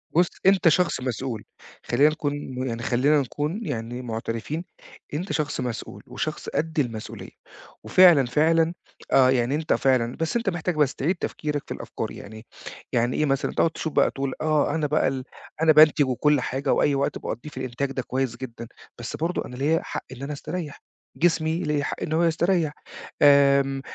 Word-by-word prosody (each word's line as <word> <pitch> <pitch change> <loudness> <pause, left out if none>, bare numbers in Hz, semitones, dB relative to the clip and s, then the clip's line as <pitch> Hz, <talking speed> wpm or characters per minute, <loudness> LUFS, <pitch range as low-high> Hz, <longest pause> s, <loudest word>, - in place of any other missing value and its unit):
بُصّ، 175 +2 +5 0.2
أنت 195 -2 +5
شخص 170 -2 +2
مسؤول، 125 -2 -3 0.4
خلّينا 140 +5 +4
نكون 155 -2 -2 0.3
يعني 120 -1 -4
خلّينا 140 +6 +3
نكون 150 - -3
يعني 120 - -4
معترفين، 115 +6 -4 0.5
أنت 175 +6 -3
شخص 150 -1 -1
مسؤول 120 -2 -5
وشخص - - -4
قد 160 0 -2
المسؤولية، 115 -6 -4 0.5
وفعلًا، 175 -7 +6
فعلًا 160 +6 +2 0.4
آه، 130 -1 +6
يعني 130 +1 +1
أنت 155 +1 0
فعلًا 125 -3 +1
بس 165 +4 -1
أنت 230 -4 -1
محتاج 175 -1 -2
بس 150 -3 +2
تعيد 170 +7 0
تفكيرك 150 -4 -3
في - - -4
الأفكار، - - -5
يعني 110 +2 -10 0.5
يعني 120 +1 +1
إيه 155 - +2
مثلًا 135 -1 0
تقعد 165 - +2
تشوف 160 -1 -5
بقى - - +3
تقول 135 -1 -3
آه، 155 -1 +1
أنا 155 -2 0
بقى 150 +2 +2
ال 130 -1 -2 0.4
أنا 160 -1 +6
بانتج 155 -1 +6
وكل 140 +2 +2
حاجة، 135 +2 -1
وأي 145 - +2
وقت 140 - -1
باقضّيه 135 +6 -6
في 150 - -15
الإنتاج 130 +1 -3
ده 135 - -2
كويس 130 -2 -2
جدًا، 115 -2 -8 0.3
بس 120 - -5
برضه 170 +3 -2
أنا 125 - -9
ليَا 150 +5 +1
حق - - -5
إن 130 0 -10
أنا 145 +2 -4
أستريح. 155 +1 -6 0.3
جسمي 160 -1 +1
ليّا 150 -1 0
حق - - -4
إن 155 - -3
هو 165 +2 +2
يستريح، 165 -1 +1 0.5
آمم 140 -1 +5
145 Hz, 175 wpm, -24 LUFS, 130-160 Hz, 0.5 s, وفعلًا